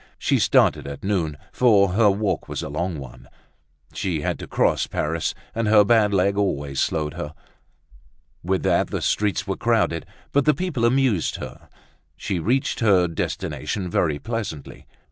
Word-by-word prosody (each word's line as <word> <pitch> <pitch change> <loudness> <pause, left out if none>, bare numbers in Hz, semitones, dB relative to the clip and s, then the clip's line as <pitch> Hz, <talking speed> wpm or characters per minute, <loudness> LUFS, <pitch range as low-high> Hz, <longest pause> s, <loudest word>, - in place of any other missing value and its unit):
She - - +1
started - - +3
at 70 0 -8
noon, 85 -7 -1
for 105 -6 +4
her 105 +3 +4
walk 100 +1 -1
was - - -4
a - - -5
long 85 +3 -2
one. 60 -2 -11 0.6
She 85 -2 -2
had - - -2
to - - -7
cross - - +1
Paris 80 +2 -2 0.2
and 115 -1 -1
her 105 -1 +6
bad 110 -1 +4
leg 100 +1 +2
always 70 -9 -1
slowed 75 -2 -1
her. 75 +2 -6 1.1
With 95 +2 0
that - - +2
the - - -4
streets 105 -1 0
were 95 -2 -2
crowded; 110 -8 +1 0.2
but 140 0 +2
the 150 -2 +4
people 150 -8 -1
amused 125 -7 +2
her; - - -9 0.5
she 95 - -2
reached 130 - 0
her 100 -7 +4
destination 80 +2 -3
very 80 -5 +1
pleasantly. 105 - -6
95 Hz, 160 wpm, -23 LUFS, 80-110 Hz, 1.1 s, her